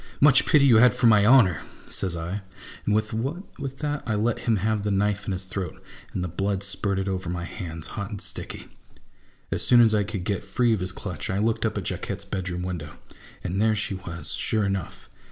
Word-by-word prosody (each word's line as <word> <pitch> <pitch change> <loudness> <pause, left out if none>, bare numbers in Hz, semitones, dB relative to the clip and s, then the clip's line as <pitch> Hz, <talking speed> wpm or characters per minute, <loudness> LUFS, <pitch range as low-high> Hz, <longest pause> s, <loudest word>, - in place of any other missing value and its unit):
" - - -24
Much - - +5
pity 150 -3 +5
you 120 -5 +7
had 125 +3 +6
for - - +1
my 105 -3 +6
honour! 115 - +6 0.2
" - - -20
says 90 -3 -2
I, 85 +5 -4 0.5
and 105 - +3
with 110 0 +1
that 140 - -4
I 110 - +1
let 110 +2 0
him 115 - +4
have 105 +1 0
the 105 - -1
knife 100 0 0
in - - -1
his 95 0 -2
throat, 95 -2 -5 0.3
and 90 - -3
the - - -1
blood 95 +3 -2
spurted 100 -1 -1
over 95 -2 -2
my 85 0 -3
hands 85 -4 -6
hot 100 -1 -5
and 105 -3 -6
sticky. - - -5 0.9
As - - +1
soon 120 - +6
as 115 -2 +6
I 105 -1 +3
could 100 -2 -4
get 100 -1 -2
free 120 -2 +2
of 110 - 0
his 90 0 -3
clutch, 95 -4 -6
I 95 - 0
looked 110 +2 +1
up - - -4
at - - -2
Jacquette's 100 0 -4
bedroom 90 -3 -3
window, 85 -5 -5 0.5
and 95 +3 -1
there 110 0 +3
she 105 -1 -1
was, 85 -2 -6
sure 110 -2 0
enough 100 -3 -4
100 Hz, 220 wpm, -25 LUFS, 95-110 Hz, 0.9 s, you